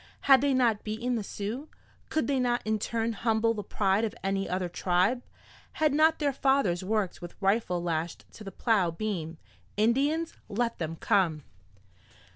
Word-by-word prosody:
Had 270 -2 +6
they 280 -1 +2
not 235 -5 +2
beaten 230 +4 -2
the 225 -3 -1
Sioux? 220 +10 -5 0.4
Could 315 - 0
they 275 -2 +1
not 245 -1 +1
in 215 0 0
turn 230 +1 -1
humble 225 +1 +1
the 215 - -4
pride 195 +1 +1
of 220 - -2
any 195 0 -1
other 180 0 -1
tribe? 180 +7 +1 0.5
Had 310 -2 +2
not 315 +2 +4
their 285 -2 0
fathers 265 -10 +1
worked 210 -1 -1
with 175 0 -10
rifle 195 -3 +1
lashed 165 -1 -3
to 215 - -11
the 195 - -7
plow 200 -3 +2
beam? 165 -3 -4 0.4
Indians? 280 +9 +1 0.2
Let 230 +2 -1
them 165 -1 -3
come! 165 -4 +1
215 Hz, 165 wpm, -28 LUFS, 185-250 Hz, 0.5 s, Had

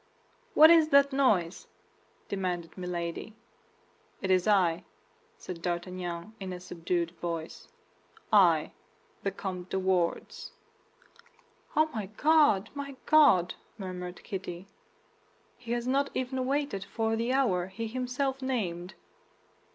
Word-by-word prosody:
"What 315 +2 +9
is 325 -2 +6
that 280 -1 +5
noise?" 200 -11 +1 0.6
demanded 180 -4 -3
Milady. 180 +3 -5 0.8
"It 190 - -1
is 185 +1 +3
I," 180 -5 +3 0.5
said 180 - -8
D'Artagnan 175 +2 -4
in 190 -2 -5
a 180 - -6
subdued 170 -1 -2
voice, 165 -2 -5 0.7
"I, - - +5 0.5
the 195 - 0
Comte 185 -2 -6
de - - -1
Wardes." 190 - -1 1.2
"Oh, 310 - +5
my 215 -5 -3
God, 290 -10 +4
my 280 -1 -6
God!" 280 - +5 0.2
murmured 180 -2 -7
Kitty, 185 -2 -6 0.9
"he 235 -1 -9
has 240 0 -2
not 275 +2 +1
even 255 0 -2
waited 280 -7 -1
for 225 +1 -1
the 230 +2 -1
hour 195 -10 +1
he 225 +4 -5
himself 255 +3 -2
named!" 190 -9 -3
195 Hz, 115 wpm, -29 LUFS, 180-260 Hz, 1.2 s, What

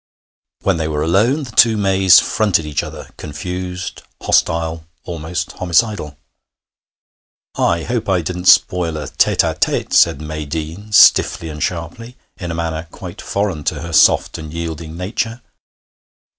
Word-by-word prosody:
When 95 -3 +1
they 80 -1 -2
were 75 -1 -2
alone, 115 - +2
the 125 - -9
two 115 -1 +5
Mays 95 -2 +5
fronted 100 -7 0
each 75 -1 -1
other, - - -9
confused, 90 +4 -6 0.2
hostile, 80 0 0 0.2
almost 85 0 -5
homicidal. 90 -4 -1 1.4
'I 85 -1 0
hope 115 0 -3
I 90 -3 +1
didn't 90 +2 -5
spoil 85 -3 +4
a 75 -2 -5
tête - - +2
à - - -1
tête,' - - -1
said 70 - +4
May 75 0 -6
Deane, 80 +7 -6
stiffly 85 -4 +5
and 75 -1 -8
sharply, 95 +8 -5 0.2
in 90 -4 -6
a 85 - -3
manner 80 -1 -3
quite - - -9
foreign 100 -7 -2
to 75 - -2
her 85 0 -7
soft - - +4
and 80 -1 -8
yielding 80 -1 -6
nature. 115 +6 -4
85 Hz, 145 wpm, -18 LUFS, 80-95 Hz, 1.4 s, two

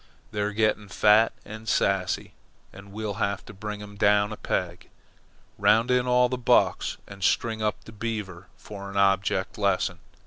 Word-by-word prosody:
"They're 105 0 -1
getting 110 -1 0
fat 105 +3 +4
and 110 +1 -8
sassy, 95 -2 0 0.4
and 100 0 -13
we'll 105 -1 -4
have 100 -1 -1
to - - -11
bring 105 +1 -6
them 105 0 -10
down 105 +1 +3
a - - -5
peg. 90 -4 -3 0.7
Round 115 +4 +4
in 125 0 +2
all 125 0 +4
the 125 0 -3
bucks 120 - +2
and 100 -1 -10
string 110 +3 +1
up 105 -1 -1
the - - -12
Beaver 105 -5 -5
for 100 -1 -9
an 100 - -6
object 100 0 +1
lesson. - - 0
105 Hz, 165 wpm, -26 LUFS, 100-110 Hz, 0.7 s, fat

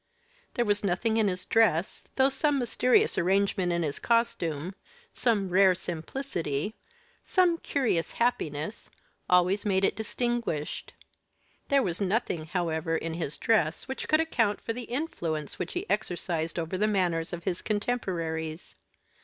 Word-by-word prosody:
There 240 - +2
was 205 -1 +1
nothing 205 +4 +1
in 220 -2 +3
his 185 -1 -2
dress, 205 -6 +2
though 265 0 +5
some 285 +1 +1
mysterious 250 0 +2
arrangement 190 0 +2
in 170 0 +1
his 145 -3 -3
costume 195 -9 0 0.4
some 210 -6 +1
rare 185 0 +5
simplicity 175 - -3 0.5
some 355 -3 +3
curious 230 - 0
happiness 185 -6 -1 0.4
always 180 +3 +4
made 195 -2 +2
it - - +1
distinguished; 230 -8 -2 0.8
there 275 -1 +4
was 180 -1 -2
nothing, 190 -5 0
however, 165 -2 -1
in 165 0 -4
his 160 -3 -4
dress 175 - +1
which 265 - -4
could 310 - +4
account 230 -10 +1
for 230 - -3
the 245 0 -6
influence 170 - -3
which - - -3
he 370 +3 -3
exercised 170 - -1
over 170 +2 -2
the 210 - +3
manners 175 -5 +1
of 175 -1 -5
his 180 -1 -2
contemporaries. 170 -8 -2
190 Hz, 140 wpm, -28 LUFS, 165-235 Hz, 0.8 s, though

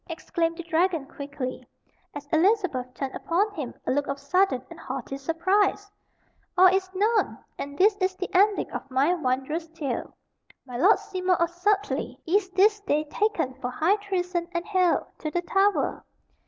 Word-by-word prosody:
exclaimed 330 0 -2
the 345 - -5
dragon 335 -2 +1
quickly, 275 -3 -6 0.5
as 290 0 -6
Elizabeth 320 - +2
turned 270 +1 -4
upon 365 +5 +1
him 290 -10 -4
a - - 0
look 285 +2 0
of 275 - -2
sudden 360 +1 +2
and 335 - -10
haughty 270 -3 -5
surprise. 380 +7 +1 0.7
"All 370 - +8
is 380 0 0
known! 430 +3 +1 0.2
And 285 0 -6
this 405 +4 +5
is 375 -1 0
the 375 - -4
ending 400 +2 +3
of - - -6
my 270 +6 +3
wondrous 300 +1 -1
tale. 300 -7 -4 0.5
My 250 -2 -9
Lord 355 - +5
Seymour 365 -1 -1
of 340 0 +1
Sudleye 400 +4 0
is 380 +3 +2
this 415 +3 +4
day 305 -7 0
taken 335 -11 0
for 250 - -2
high 325 +10 +2
treason 360 -4 -2
and 340 - -1
haled(1) 370 -4 +2
to 310 - -3
the 350 +3 -1
Tower. 390 +3 +1
345 Hz, 165 wpm, -26 LUFS, 285-385 Hz, 0.7 s, All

